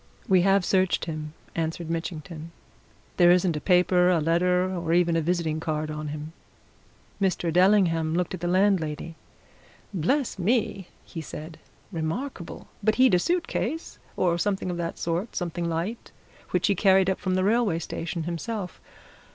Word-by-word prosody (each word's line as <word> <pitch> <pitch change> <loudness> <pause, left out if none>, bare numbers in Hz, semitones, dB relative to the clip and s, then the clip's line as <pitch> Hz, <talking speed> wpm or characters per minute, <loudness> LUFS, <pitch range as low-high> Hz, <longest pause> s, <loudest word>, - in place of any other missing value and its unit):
"We 185 -2 +5
have 195 0 +3
searched 190 -1 +2
him," 155 -1 -6 0.2
answered 165 0 -3
Mitchington. 165 -1 -5 0.7
"There 175 -1 +6
isn't 175 -1 +4
a 150 - -3
paper, 180 -1 +4
a 175 -2 +3
letter, 180 +3 +2
or 170 -2 -1
even 170 -1 +3
a 165 - +2
visiting 160 -1 0
card 155 -1 -2
on 150 0 -5
him." 150 +2 -6 0.9
Mr. 175 -3 0
Dellingham 175 -4 +3
looked 180 +2 -1
at 185 - -4
the 175 - -2
landlady. 175 -4 +1 0.8
"Bless 215 - 0
me!" 200 -2 0 0.2
he 165 - -7
said. 155 +1 -8 0.3
"Remarkable! 170 - -4 0.2
But 215 +1 +3
he'd 255 -3 +5
a 180 - +5
suit 345 - 0
case, 320 +8 -3 0.2
or 170 -2 +2
something 195 -1 -1
of 175 - -4
the 170 -1 -2
sort 170 +6 -3
something 170 -1 -2
light 170 +8 -3 0.4
which 180 0 +1
he 205 - +3
carried 190 0 +4
up 190 - 0
from 185 -1 -1
the 185 - +1
railway 215 -4 +2
station 170 0 -4
himself. 180 +3 -4
175 Hz, 160 wpm, -26 LUFS, 165-190 Hz, 0.9 s, There